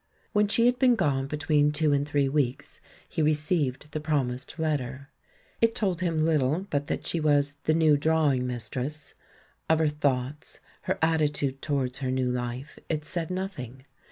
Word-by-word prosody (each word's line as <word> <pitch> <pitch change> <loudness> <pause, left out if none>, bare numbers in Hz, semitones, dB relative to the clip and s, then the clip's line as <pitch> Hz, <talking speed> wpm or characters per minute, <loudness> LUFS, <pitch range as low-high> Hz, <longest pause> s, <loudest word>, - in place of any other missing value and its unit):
When 210 0 +3
she 225 +3 +3
had 245 0 +3
been 255 -2 +5
gone 135 -9 0
between 150 0 +2
two 150 0 +2
and 140 0 +1
three 145 -1 +1
weeks, 135 -3 -1 0.3
he - - -2
received 150 -2 0
the 155 - -3
promised 140 -4 -2
letter. 140 -4 -2 0.5
It 230 0 +3
told 185 -5 -1
him 165 -3 +1
little 155 +3 +1
but 145 0 -1
that - - -3
she 170 - -1
was 145 -2 +2
"the 155 - +3
new 155 -3 +5
drawing 145 -4 +2
mistress"; 130 +5 -5 0.6
of 160 - +5
her 160 -1 +2
thoughts, 145 -1 -2 0.3
her - - +1
attitude 150 -4 +1
towards 135 -3 -1
her 130 -2 -2
new 130 -1 0
life, 125 +3 -4
it 155 -2 -2
said 170 -2 -3
nothing. 160 - -5
150 Hz, 165 wpm, -27 LUFS, 135-160 Hz, 0.6 s, been